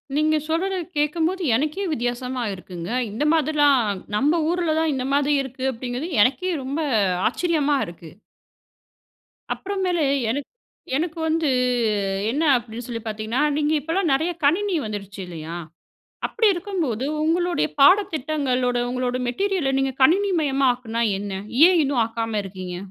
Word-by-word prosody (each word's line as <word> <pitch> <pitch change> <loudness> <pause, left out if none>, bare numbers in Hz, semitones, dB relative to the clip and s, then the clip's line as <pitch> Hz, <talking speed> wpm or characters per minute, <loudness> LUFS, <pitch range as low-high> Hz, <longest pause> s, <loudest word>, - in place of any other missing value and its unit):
நீங்க 310 +1 +2
சொல்றது 375 +4 0 0.2
கேக்கும்போது 325 +5 0
எனக்கே 305 +9 -1
வித்தியாசமா 245 0 -2
இருக்குங்க. 180 -1 -8 0.2
இந்த 230 +8 -2
மாதிரிலாம் 290 -4 +3 0.3
நம்ம 295 +9 +2
ஊர்ல 345 -3 0
தான் 320 -1 +1
இந்த 255 -1 -2
மாதிரி 285 +1 +2
இருக்கு 265 0 -6
அப்படிங்கிறது, 250 +5 -5
எனக்கே 275 - +2
ரொம்ப 275 +5 -3 0.5
ஆச்சரியமா 295 +1 +1
இருக்கு. 170 -1 -11 1.4
அப்புறமேலு 375 -4 -1 0.3
எனக் 280 +4 -2 0.5
எனக்கு 325 +3 -2
வந்து 320 -1 +1 0.8
என்ன 300 +5 0
அப்படின்னு 235 0 -7
சொல்லி 230 -2 -5
பாத்தீங்கன்னா, 220 +4 -2 0.2
நீங்க 300 0 +1
இப்பலாம் 325 +2 0
நிறைய 320 +6 +1
கணினி 365 +6 +2
வந்துருச்சு 200 -2 -6
இல்லையா. 165 -1 -7 0.7
அப்டி 450 -1 +1
இருக்கும் 370 +1 -3
போது 245 -1 -2 0.2
உங்களுடைய 345 +2 +1
பாடத்திட்டங்களோட 285 -8 +3
உங்களோட 250 0 -1
மெட்டீரியல, 370 +1 0
நீங்க 270 -1 0
கணினி 385 +8 +4
மயமாக்குனா 255 -5 0 0.2
என்ன? 205 0 -5 0.3
ஏன் 360 -2 +4
இன்னும் 275 -4 +1
ஆக்காம 225 -1 -3
இருக்கீங்க? 185 -2 -7
280 Hz, 125 wpm, -23 LUFS, 240-330 Hz, 1.4 s, கணினி